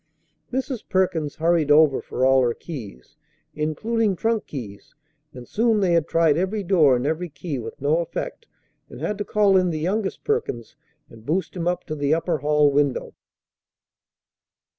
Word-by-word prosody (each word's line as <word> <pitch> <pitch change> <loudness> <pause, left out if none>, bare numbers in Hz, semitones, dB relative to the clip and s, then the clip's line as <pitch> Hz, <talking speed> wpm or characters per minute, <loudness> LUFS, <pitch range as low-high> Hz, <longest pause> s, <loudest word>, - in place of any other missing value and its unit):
Mrs. 260 -2 -3
Perkins 180 -6 0
hurried 165 -2 +1
over 150 -2 +5
for 130 - -1
all 135 0 +5
her 120 -2 +1
keys, 110 - -10 0.4
including 205 +8 -1
trunk 225 +3 -1
keys; 105 -8 -9 0.4
and 125 -5 -11
soon 225 -1 +2
they 185 -3 +2
had 165 -2 +2
tried 165 -3 +3
every 195 +4 -1
door 165 -8 +4
and 125 +2 -2
every 160 +4 -2
key 150 -2 -5
with 115 -1 -8
no 145 +4 +2
effect, 460 - -5 0.4
and - - -10
had 210 -1 -3
to - - 0
call 205 -2 +3
in 180 -1 +2
the 160 - -2
youngest 190 +6 -2
Perkins 435 - -2 0.3
and 110 -1 -15
boost 170 +11 -2
him 175 -1 -3
up 180 0 -1
to 155 - -6
the 145 0 +1
upper 165 -1 -1
hall 150 0 +3
window. 140 -2 0
165 Hz, 165 wpm, -23 LUFS, 145-190 Hz, 0.4 s, over